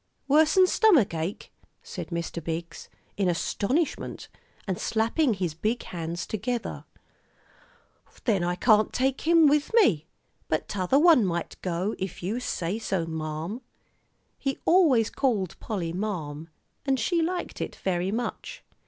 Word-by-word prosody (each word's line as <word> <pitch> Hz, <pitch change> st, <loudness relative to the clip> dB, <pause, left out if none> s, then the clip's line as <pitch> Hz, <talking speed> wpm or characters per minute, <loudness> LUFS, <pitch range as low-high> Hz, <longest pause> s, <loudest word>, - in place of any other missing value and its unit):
"Worse'n 315 Hz, +6 st, +5 dB
stomach 360 Hz, -, +4 dB
ache," 165 Hz, +5 st, -4 dB, 0.3 s
said -, -, -6 dB
Mr. 170 Hz, -1 st, -4 dB
Biggs, 165 Hz, +1 st, -5 dB, 0.3 s
in 195 Hz, -3 st, +2 dB
astonishment, 250 Hz, -, -1 dB, 0.4 s
and 190 Hz, -2 st, -2 dB
slapping 230 Hz, +3 st, +1 dB
his 180 Hz, -4 st, -2 dB
big 215 Hz, +9 st, -2 dB
hands 170 Hz, 0 st, -5 dB
together; 230 Hz, +2 st, -3 dB, 1.4 s
"then 200 Hz, -7 st, +2 dB
I 175 Hz, 0 st, 0 dB
can't 215 Hz, +2 st, +4 dB
take 265 Hz, +1 st, 0 dB
him 335 Hz, -1 st, +6 dB
with 295 Hz, 0 st, +3 dB
me. 175 Hz, -, +4 dB, 0.4 s
But 155 Hz, -, -1 dB
t'other 195 Hz, +7 st, +1 dB
one 315 Hz, -5 st, +6 dB
might 170 Hz, -3 st, -2 dB
go, 185 Hz, +4 st, -1 dB
if 190 Hz, -2 st, -5 dB
you 210 Hz, +7 st, -1 dB
say 195 Hz, -4 st, -2 dB
so, 190 Hz, -6 st, -1 dB
marm." 160 Hz, +7 st, -4 dB, 0.8 s
He 270 Hz, -1 st, -2 dB
always 300 Hz, -, +4 dB
called 215 Hz, -, 0 dB
Polly 175 Hz, -6 st, -3 dB
marm, 165 Hz, -6 st, -4 dB, 0.3 s
and 270 Hz, -2 st, +1 dB
she 335 Hz, +9 st, +1 dB
liked 350 Hz, +2 st, -3 dB
it -, -, -4 dB
very 185 Hz, 0 st, -1 dB
much. 245 Hz, -, -4 dB
210 Hz, 135 wpm, -27 LUFS, 170-270 Hz, 1.4 s, him